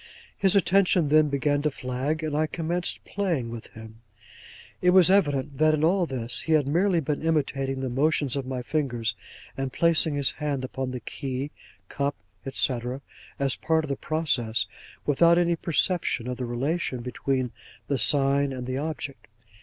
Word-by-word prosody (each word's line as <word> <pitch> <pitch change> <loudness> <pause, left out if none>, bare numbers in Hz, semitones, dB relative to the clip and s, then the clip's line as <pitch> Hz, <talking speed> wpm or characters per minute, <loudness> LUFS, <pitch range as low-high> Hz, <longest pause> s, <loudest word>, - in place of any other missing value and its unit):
His 195 0 +2
attention 185 -5 +3
then 155 0 +5
began 145 +1 +1
to 150 - +1
flag, 135 +4 -3
and 155 -2 -2
I 155 +1 +1
commenced 170 +2 -2
playing 170 -13 -2
with 115 -1 -8
him. 110 0 -13 0.8
It 180 +1 +4
was 185 -1 +7
evident 145 -7 +1
that 155 0 +4
in 155 - -2
all 175 +2 +3
this 120 -4 -1
he 160 - 0
had 150 -3 +3
merely 175 +4 +2
been 145 0 -2
imitating 135 -4 -1
the 130 - -2
motions 145 0 +1
of 135 -2 -3
my 130 -1 -4
fingers, 125 -6 -1 0.4
and 135 -1 -3
placing 165 -1 +3
his 140 -2 +4
hand 145 -3 -3
upon 130 0 -4
the 125 -1 -5
key, 135 +4 -4 0.4
cup, 140 0 -2 0.4
&c., 130 -2 +1 0.6
as 135 -2 +1
part 160 0 +1
of 155 - -6
the 140 - 0
process, 145 -8 0 0.4
without 170 +4 +4
any 175 -1 +2
perception 165 -6 0
of 125 -1 -3
the 125 - -3
relation 130 +2 -2
between 130 0 -2 0.4
the 140 -2 0
sign 140 0 +3
and 125 -1 -5
the 130 +1 -3
object. 150 -2 -5
145 Hz, 170 wpm, -26 LUFS, 130-160 Hz, 0.8 s, was